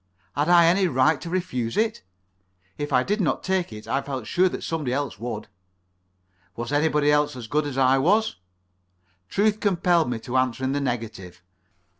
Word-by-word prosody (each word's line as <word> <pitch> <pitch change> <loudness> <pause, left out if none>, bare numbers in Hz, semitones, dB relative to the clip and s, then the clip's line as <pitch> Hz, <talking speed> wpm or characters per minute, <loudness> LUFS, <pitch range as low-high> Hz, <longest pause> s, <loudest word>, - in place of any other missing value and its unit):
Had 145 +4 0
I 175 -1 +7
any 185 +3 +3
right 140 +1 +2
to 170 - -6
refuse 130 -11 -2
it? 220 0 0 0.7
If 145 0 -5
I 125 -1 +3
did 210 +6 -1
not 165 - 0
take 190 -5 -1
it, 105 0 -10
I 135 - 0
felt 135 -5 -5
sure 185 +10 +2
that - - -6
somebody 155 -6 -2
else 135 -5 -2
would. 110 -2 -5 1.1
Was 120 +3 -5
anybody 150 0 +2
else 150 -2 +2
as 125 -2 -7
good 145 +6 0
as 135 -2 -5
I 135 0 +4
was? 205 - +2 0.9
Truth 210 +1 +1
compelled 175 -6 +2
me 120 - -2
to 125 +3 -2
answer 130 0 0
in 130 - 0
the 145 +1 -1
negative. 110 -9 -5
145 Hz, 180 wpm, -24 LUFS, 125-175 Hz, 1.1 s, I